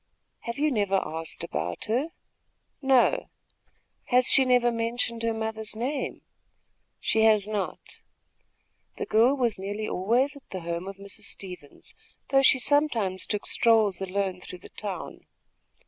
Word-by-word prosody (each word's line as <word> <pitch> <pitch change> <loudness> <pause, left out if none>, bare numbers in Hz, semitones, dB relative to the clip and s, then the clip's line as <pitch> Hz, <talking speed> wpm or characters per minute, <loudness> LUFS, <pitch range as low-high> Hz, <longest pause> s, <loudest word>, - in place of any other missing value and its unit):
"Have 235 +1 -6
you 300 +1 +2
never 200 -5 +2
asked 160 +1 -5
about 80 +4 -3
her?" 250 +9 0 0.7
"No." 270 - +3 0.8
"Has 250 0 +4
she 265 - +5
never 245 -1 +4
mentioned 230 0 -2
her 230 0 +1
mother's 220 -1 -4
name?" 260 +5 -3 0.8
"She 220 - +1
has 215 -2 +4
not." 210 -3 -4 1.0
The - - -3
girl 235 +5 +4
was 235 -6 0
nearly 205 +3 -4
always 240 +10 +1
at 280 - -15
the 185 - -5
home 170 +2 -4
of 195 0 -7
Mrs. 200 +1 -9
Stevens, 180 -7 -7 0.4
though 270 0 +5
she 260 - +6
sometimes 250 -9 +1
took 210 -1 -2
strolls 220 -5 +3
alone 190 -1 -2
through 180 - -8
the - - -10
town. 195 -5 -6
220 Hz, 140 wpm, -27 LUFS, 195-245 Hz, 1.0 s, she